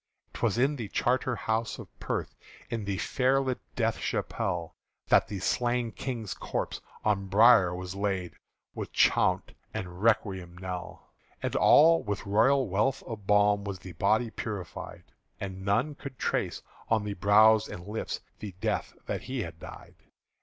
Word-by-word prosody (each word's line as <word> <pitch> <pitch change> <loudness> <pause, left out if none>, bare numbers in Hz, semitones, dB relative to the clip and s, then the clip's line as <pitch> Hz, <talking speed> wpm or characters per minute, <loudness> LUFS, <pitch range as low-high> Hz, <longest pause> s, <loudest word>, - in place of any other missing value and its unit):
'T - - -8
was - - +1
in 140 +4 +2
the 115 -4 -4
Charterhouse 115 -2 0
of - - -9
Perth, - - -3 0.4
In 115 -3 -2
the 100 -1 -2
fair 130 +6 +2
lit 130 -2 -1 0.2
Death 115 -2 0
chapelle, 85 -2 -2 0.4
That - - +5
the 100 - -5
slain 120 +5 0
King's 115 -7 -4
corpse - - -4 0.2
on 100 -2 +1
bier 100 -3 +6
was 90 0 -5
laid 95 -3 -2 0.4
With - - -6
chaunt - - +3 0.2
and 90 0 -5
requiem 95 -6 +1
knell. 90 -2 -7 0.3
And - - -2
all 165 +2 +6
with 105 -1 -4
royal 130 +7 +3
wealth 105 +8 0
of 110 -5 -8
balm 105 0 +4
Was 100 -2 -4
the 95 0 -10
body 110 +7 +1
purified; 105 -6 -6 0.4
And 95 -1 -6
none 115 +10 +1
could 140 -2 -9
trace - - -1 0.3
on 110 -2 +2
the 105 -1 -3
brow 105 +3 +6
and 85 - -8
lips 105 +2 -4 0.2
The 100 -4 -7
death - - -2
that - - -3
he 130 -3 -3
had 85 -2 -9
died. - - -11
105 Hz, 155 wpm, -29 LUFS, 95-120 Hz, 0.4 s, bier